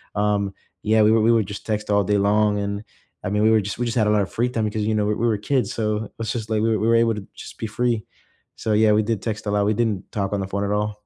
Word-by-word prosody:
um, 100 -1 0 0.3
yeah, 110 +1 +3
we 110 - +5
were 115 - +4
we 115 +2 +4
were 115 -2 +3
just 100 +1 -8
text 105 -1 -2
all 100 0 +3
day 105 +1 +2
long, 105 +1 +2
and 100 +1 -3 0.4
I 90 - -2
mean, 105 0 +1
we 110 - +5
were 110 - +5
just 100 +3 -5
we 120 - 0
just 120 +1 -2
had 110 - +3
a - - +3
lotta 100 -2 +2
free 120 +2 -1
time 115 -3 -1
because 105 0 -2
you 110 - +1
know, 105 -1 +1
we 105 - +1
we 120 - 0
were 110 -2 +1
kids, 125 -1 0
so, 105 -1 -1
it - - -14
was 115 0 -2
just, 115 -2 -4
like, 110 -1 +1
we 110 -1 +2
we 110 - 0
were 115 - +4
able 115 -1 +3
to 100 -2 -8
just - - -10
be 115 - -3
free. 115 -1 -1 0.5
So 110 - -1
yeah, 110 0 +4
we 110 - +4
did 110 -2 -2
text 110 -2 -4
a - - 0
lot, 100 0 +2
we 105 - +2
didn't 105 -5 -1
talk 100 -1 -2
on 100 - 0
the 95 - -3
phone 100 +1 -2
at 100 - -2
all. 105 0 -1
105 Hz, 320 wpm, -22 LUFS, 105-110 Hz, 0.5 s, we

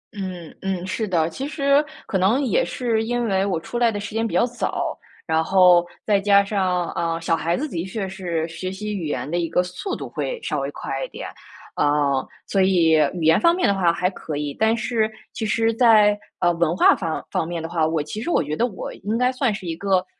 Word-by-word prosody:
嗯 185 -4 -6
嗯， 190 -2 -2
是 220 +2 -2
的。 165 -3 +1
其 270 - -5
实 280 -1 +2 0.2
可 190 - -1
能 210 +9 +3
也 - - +2
是 230 - -1
因 240 +1 -1
为 195 -2 +1
我 185 -5 -1
出 240 +8 -5
来 235 -2 +4
的 205 - -4
时 205 +1 -7
间 225 +1 0
比 - - -7
较 - - +4
早， 245 0 -3 0.3
然 160 -1 +1
后 180 -1 +5 0.2
再 205 -2 +3
加 200 0 +5
上， 185 -4 0
啊， 165 -1 -2
小 165 0 +1
孩 170 +2 -1
子 305 - -2
的 170 - -4
确 190 +1 -4
是 175 -4 -3
学 185 +3 -5
习 210 +2 -4
语 170 -5 -3
言 145 - -3
的 175 - -1
一 165 -2 -1
个 180 +2 +2
速 185 - -5
度 - - -6
会 - - -4
稍 - - -1
微 - - -2
快 - - -4
一 - - -3
点。 - - -7 0.5
啊， 145 - +2 0.6
所 195 - +1
以 180 -4 +4 0.2
语 170 - -4
言 160 +1 +4
方 340 0 +5
面 365 - +1
的 200 - +3
话 180 -3 +2
还 180 +2 0
可 155 -5 -6
以， 145 -1 -3
但 220 +1 +3
是 220 -1 0 0.2
其 - - -5
实 225 +1 +1
在， 215 -3 +5 0.2
呃， 175 -1 +3
文 170 +1 0
化 - - +6
方 165 -4 -4
方 160 - -1
面 170 -2 -4
的 - - -3
话， 165 -2 +1
我 160 -2 0
其 210 +8 -6
实 345 - -3
我 335 - +2
觉 150 +1 -3
得 240 - +1
我 200 -6 -7
应 215 +3 -3
该 250 +1 +2
算 255 -3 0
是 200 -3 -6
一 165 -1 -3
个 190 -1 +1
190 Hz, 255 characters per minute, -22 LUFS, 170-225 Hz, 0.6 s, 化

